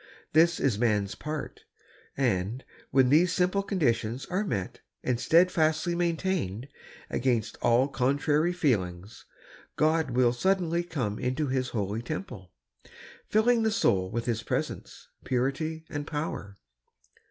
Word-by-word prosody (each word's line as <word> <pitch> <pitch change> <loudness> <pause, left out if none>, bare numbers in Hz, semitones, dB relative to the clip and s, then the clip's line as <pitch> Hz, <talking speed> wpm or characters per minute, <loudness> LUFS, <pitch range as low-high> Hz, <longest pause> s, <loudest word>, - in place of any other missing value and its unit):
This 165 +2 +4
is 120 -7 +1
man's 105 -4 +1
part, 150 +7 -6 0.6
and, 120 -1 0 0.2
when 130 -1 +4
these 170 +5 +4
simple 180 +3 +1
conditions 130 - -1
are 185 +3 -1
met 100 - -3 0.2
and 125 -2 0
steadfastly 165 +1 +3
maintained, 170 - -1 0.4
against 120 -4 0
all 120 +3 +4
contrary 145 +5 +1
feelings, 100 - -2 0.5
God 160 -1 +2
will 120 -1 +3
suddenly 175 +3 +1
come 125 -12 -3
into 130 +3 -1
His 130 -1 -1
holy 105 0 -2
temple, 120 - -6 0.8
filling 230 +2 +3
the 220 - +2
soul 95 - +1
with 115 +3 -3
His 115 -2 -1
presence, - - -4 0.2
purity, 140 +6 -1
and 145 0 -5
power. 145 -10 -4
135 Hz, 120 wpm, -28 LUFS, 115-170 Hz, 0.8 s, This